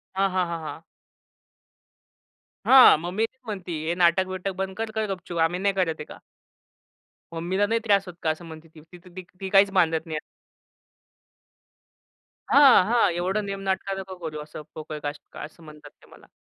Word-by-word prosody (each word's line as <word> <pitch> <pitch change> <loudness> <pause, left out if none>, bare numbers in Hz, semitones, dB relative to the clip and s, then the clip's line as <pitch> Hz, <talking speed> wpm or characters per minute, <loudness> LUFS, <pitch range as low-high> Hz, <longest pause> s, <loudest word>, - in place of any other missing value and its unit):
हां, 195 0 +2
हां, 185 -1 +1
हां, 170 -1 -4
हां. 160 - -7 1.8
हां. 260 -8 +8
मम्मी 185 +6 -1
तेच 260 +3 -14
म्हणती, 190 -5 -6
हे 170 - +1
नाटक-बिटक 185 +2 +1
बंद 190 0 -4
कर. 225 0 -3
कर 220 0 -2
गपचूप. 175 -2 -7
आम्ही 170 +3 +1
नाही 200 0 +1
करत 175 -4 0
आहे 150 - -6
का. - - -12 1.1
मम्मीला 180 +5 0
नाही 230 +1 +1
त्रास 200 -3 +3
होत 180 - -8
का 160 - +1
असं 160 +2 -3
म्हणते, 160 0 -11
ती 160 +3 -15
तर 180 - -13 0.3
ती 190 -1 -5
काहीच 195 0 +5
बांधत 165 -4 +1
नाही. 160 -2 -4 2.3
हां. 275 -9 +7
हां. 225 -4 +3
एवढं 185 +5 -1
नेम 195 0 -5
नाटकं 195 +1 -1
नको 190 -1 -8
करू 155 -2 -5
असं 155 0 -10
पोकळ 155 -1 -7
कष्ट 145 +1 -7
असं 160 +2 -16
म्हणतात 150 -1 -13
ते - - -19
मला. - - -17
185 Hz, 170 wpm, -25 LUFS, 165-195 Hz, 2.3 s, हां